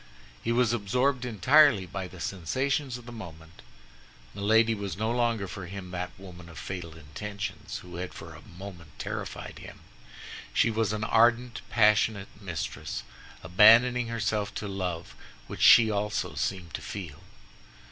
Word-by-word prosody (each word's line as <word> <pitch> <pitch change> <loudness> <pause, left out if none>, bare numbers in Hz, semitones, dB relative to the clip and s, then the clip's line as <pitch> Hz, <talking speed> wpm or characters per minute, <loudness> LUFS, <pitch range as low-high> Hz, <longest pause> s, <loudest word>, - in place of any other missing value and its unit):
He 115 - -1
was 120 -1 +3
absorbed 125 +4 0
entirely 125 0 +5
by 95 +1 -5
the 90 0 -13
sensations 130 - -1
of 120 - -13
the 120 - -9
moment. 85 -7 -11 0.7
Milady 110 +3 +3
was 100 -4 -5
no 110 +2 0
longer 115 -4 0
for 100 -2 -7
him 95 0 -8
that 90 0 -3
woman 90 -2 -12
of 85 - -12
fatal 85 -4 -6
intentions 100 +7 -6
who 90 -1 -9
had 90 0 -4
for - - -10
a - - -12
moment 85 -3 -11
terrified - - -6
him; - - -11 0.7
she - - +4
was 110 -2 0
an 105 0 -2
ardent, 120 +2 +3
passionate 105 -2 +3
mistress, 90 -5 -5 0.4
abandoning 115 +7 +6
herself 110 -2 -2
to 105 - -4
love 90 -4 -4 0.3
which - - -8
she 110 -2 +8
also 105 +1 -1
seemed 90 -5 -3
to - - -4
feel. 85 -6 -7
100 Hz, 145 wpm, -28 LUFS, 90-115 Hz, 0.7 s, she